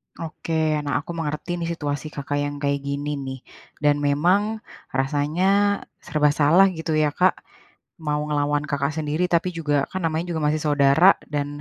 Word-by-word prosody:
Oke, 165 0 -6 0.3
nah 145 - -2
aku - - -7
mengerti 150 +2 -3
nih 170 - -2
situasi 145 -2 -3
Kakak 145 0 -3
yang 145 0 -3
kayak 140 0 +1
gini 145 +1 -2
nih, 130 0 -6 0.4
dan 145 0 +4
memang 170 +8 +3 0.5
rasanya 170 +9 +1
e - - -29
serba 150 -1 +2
salah 165 +7 +6
gitu 160 -1 -2
ya, 150 - +1
Kak. 185 +2 +3 0.7
Mau 150 -1 -1
ngelawan 145 0 0
kakak 140 -2 -1
sendiri 155 +3 -1
tapi 170 +1 +2
juga, 155 -3 -1 0.2
kan 185 - -3
namanya 160 +1 -1
juga 160 - -2
masih 150 +1 +1
saudara 145 +5 +5 0.2
dan 145 -1 0
150 Hz, 165 wpm, -23 LUFS, 145-165 Hz, 0.7 s, salah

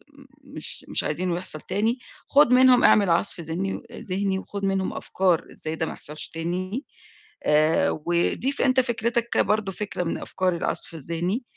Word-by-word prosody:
إمم، 280 -1 -16 0.2
مش 275 - -5
مش - - +2
عايزينه 180 -1 -1
يحصَل 165 -4 -6
تاني، 225 +5 0 0.3
خُد 285 -3 +5
منهم 250 -1 +6
اعمل 200 -3 +5
عصْف 170 +2 +1
ذني 170 +4 -3
أ - - -8
ذهني 190 0 -1
وخُد 200 +1 -5
منهم 195 -1 0
أفكار 185 -3 0
إزاي 155 0 -2
ده 160 - -1
ما - - -5
يحصَلش 150 +1 -4
تاني 185 - -3 0.6
آآ، 155 +2 +3 0.2
وضيف 175 +11 0
أنت 260 -1 +4
فكرِتك 235 -1 -1
برضه، 210 -2 +2
فكرة 195 -1 -3
من 165 - -2
أفكار 185 -1 -1
العصْف 170 - -3
الذهني، 170 - -2
190 Hz, 160 wpm, -25 LUFS, 170-235 Hz, 0.6 s, منهم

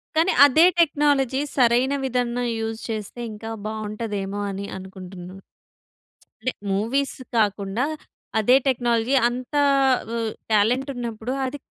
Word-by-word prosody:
కానీ 330 +4 +3
అదే 310 +4 +6
టెక్నాలజీ 285 -4 +2
సరైన 250 +1 +3
విధన్న 245 -2 -1 0.2
యూజ్ 225 0 -3
చేస్తే 215 +1 -5
ఇంకా 225 +1 -7 0.2
బాగుంటదేమో 210 -2 -4
అని 195 +1 -5
అనుకుంటున్నా. 185 -1 -10 1.0
అంటే 255 - 0 0.2
మూవీస్ 235 +8 0 0.2
కాకుండా 205 +1 0 0.6
అదే 245 +4 +5
టెక్నాలజీ 240 0 +1
అంతా 255 +4 -2 0.5
ఆహ్, 225 -1 -1 0.2
టాలెంటున్నప్పుడు 240 +1 0
అది 260 +3 -4
235 Hz, 100 wpm, -23 LUFS, 210-260 Hz, 1.0 s, అదే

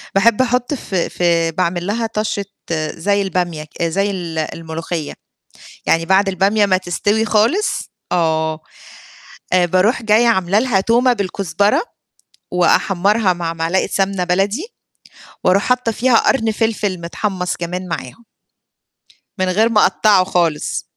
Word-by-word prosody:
باحب 210 +4 +4
أحُط 250 +2 0
في 190 -9 -2
في 170 -2 +1
باعمل 175 +1 -2
لها 225 +2 -1
طَشّة 215 -2 -2 0.5
زي 200 +4 0
البامية 175 -5 -2
ك 155 +3 -7
زي 195 +5 0
ال 170 -4 -5
الملوخية. 160 0 -4 0.7
يعني 165 0 +2
بعد 195 +2 +3
البامية 200 +3 +2
ما 185 -2 +3
تستوي 205 +4 0
خالص 230 - +1 0.2
آه. 160 -2 0 0.9
آآ 180 -1 +4
باروح 185 +7 +1
جاية 220 +2 +3
عامل 190 -5 +1
لها 220 -7 +2
تومة 240 +5 +3
بالكزبرة 200 -2 0 0.7
وأحمَّرها 195 +2 +2
مع 170 -1 -4
معلقة 165 +3 0
سمنة 195 -1 0
بلدي 195 - 0 0.8
وأروح 190 +2 +3
حاطّة 250 -2 +1
فيها 245 +1 +2
قرن 225 -4 +2
فلفِل 210 -4 -1
متحمَّص 180 +1 -3
كمان 180 +2 -5
معاهم. 165 - -6 1.1
من 185 - 0
غير 215 +5 +3
ما 220 -2 +3
أقطَّعه 195 -1 +3
خالص. 170 -5 -1
190 Hz, 130 wpm, -18 LUFS, 175-215 Hz, 1.1 s, باحب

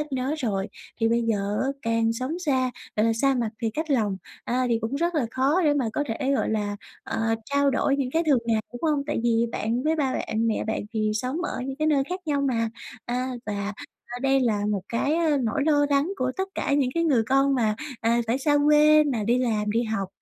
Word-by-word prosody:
ít 300 -1 -5
nói 265 +3 -1
rồi. 200 -7 -1 0.3
Thì 225 - +3
bây 235 +1 +2
giờ 205 -2 -1
á, 265 - 0
càng 230 0 +1
sống 255 +8 -3
xa, 265 -7 +1 0.3
gọi 215 +1 +3
là, 230 - +3
xa 270 +4 +2
mặt 235 -4 -1
thì 225 - +1
cách 315 +7 -4
lòng, 215 -8 +1 0.3
à, 255 +1 0
thì 230 -1 +2
cũng 225 +4 -3
rất 340 +3 0
là 290 -7 +1
khó 275 +9 +2
để 295 -1 +4
mà 265 -5 0
có 290 - -1
thể, 265 +3 -1
gọi - - 0
là, 205 -2 -1 0.3
ờ, 225 0 0
trao 280 +2 +2
đổi 275 +1 +1
những 270 -3 -1
cái 325 +4 +1
thường 285 -4 +5
ngày, 225 -2 +2
đúng 245 - -9
hông? 300 -3 +1
Tại 295 -5 -1
vì 235 0 +2
bạn 230 +3 -1
với 315 +2 +1
ba 275 -4 0
bạn, 225 -1 -1
mẹ 225 - 0
bạn 220 - -2
thì 215 -2 0
sống 255 +6 -2
ở - - -3
những 270 0 -4
cái 310 +1 +1
nơi 285 -3 +3
khác 365 +1 -3
nhau 290 -2 +1
mà. 235 -5 0 0.4
À, 250 +2 -2 0.2
và 205 0 -3 0.5
đây 270 0 +3
là 225 -5 +1
một 200 -3 -1
cái, 275 +6 0
à, 325 -3 +2
nỗi 240 +5 0
lo 290 -2 +3
lắng 285 +6 +2
của 255 0 -1
tất 380 0 -2
cả - - -1
những 275 -3 +2
cái 335 - +1
người 270 -8 +3
con 275 +1 +3
mà, 220 -4 +1 0.3
à, 230 +1 +2
phải 235 +4 +1
xa 290 +1 +2
quê 300 +1 +6
mà 245 -7 -1
đi 240 +4 +2
làm, 215 -4 0
đi 230 +3 +1
học, 210 -4 -2
255 Hz, 245 wpm, -25 LUFS, 225-290 Hz, 0.5 s, quê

